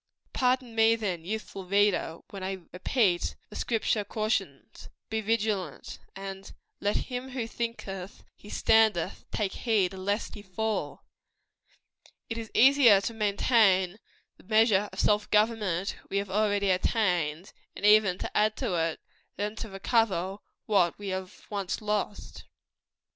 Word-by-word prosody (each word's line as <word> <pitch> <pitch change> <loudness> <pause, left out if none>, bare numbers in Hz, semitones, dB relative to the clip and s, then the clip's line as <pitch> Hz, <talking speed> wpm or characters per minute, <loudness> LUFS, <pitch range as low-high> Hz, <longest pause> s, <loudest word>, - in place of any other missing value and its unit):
Pardon 250 -2 +1
me, 225 0 +4
then, 190 -7 -3
youthful 205 -1 -5
reader, 200 -4 +1
when 195 - -7
I 190 -1 -4
repeat 185 -1 +1 0.2
the - - -10
Scripture 225 -2 0
cautions 200 - -3 0.2
"Be 220 0 0
vigilant;" 210 -7 -2 0.2
and 195 0 -7 0.3
"Let 205 +1 0 0.2
him 250 +1 -4
who 250 -3 -3
thinketh 210 -5 -5
he 205 - -14
standeth, 215 -7 +2
take 200 -3 -1
heed 205 -6 +1
lest 200 +3 -2
he 205 - -8
fall." 205 -5 -3 1.3
It 225 - -2
is 225 -1 -7
easier 260 -5 +7
to 215 +4 -4
maintain 205 -3 +2 0.4
the - - -19
measure 215 -1 +3
of - - -9
self 210 0 +2
government 210 -4 +1
we 200 - -1
have 200 -1 -2
already 205 -1 +2
attained, 180 -4 0 0.2
and 205 - -4
even 210 -3 +5
to - - -6
add 215 0 +3
to 240 -8 -2
it, 165 -1 0 0.4
than 210 +1 -3
to 225 - -6
recover 195 -2 0 0.3
what 195 -6 +2
we 205 -1 -6
have 185 0 -6
once 200 -3 -2
lost. 210 -1 -3
205 Hz, 135 wpm, -28 LUFS, 190-220 Hz, 1.3 s, easier